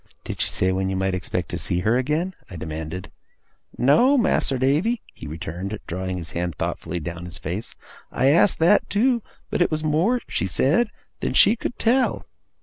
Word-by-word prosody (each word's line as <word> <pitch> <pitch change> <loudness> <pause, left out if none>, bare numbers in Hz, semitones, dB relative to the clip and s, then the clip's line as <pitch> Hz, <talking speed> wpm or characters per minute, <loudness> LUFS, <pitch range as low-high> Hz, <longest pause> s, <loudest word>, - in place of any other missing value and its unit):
'Did - - -5
she - - +2
say 95 - +1
when 95 0 0
you 95 - -1
might 95 0 0
expect 90 -2 -2
to - - -3
see 90 - -1
her 110 +5 +2
again?' 150 +8 0 0.2
I 90 - -8
demanded. 80 +2 -6 0.7
'No, 240 - +5
Mas'r 150 - +2
Davy,' 155 - +1
he - - -9
returned, 85 +6 -5
drawing 95 +1 -3
his 85 -2 -7
hand 85 -2 -2
thoughtfully 85 - -3
down 85 +2 -6
his 90 +1 -7
face. 95 +8 -5 0.4
'I - - 0
asked 170 +7 +4
that 170 +6 +4
too; 235 +3 +2 0.3
but - - 0
it - - +4
was 155 0 -2
more 165 +11 +2
(she 95 - -1
said) 145 - +2 0.3
than - - -2
she 215 - +6
could 240 - -5
tell. 255 +3 +2
110 Hz, 185 wpm, -23 LUFS, -, 0.7 s, she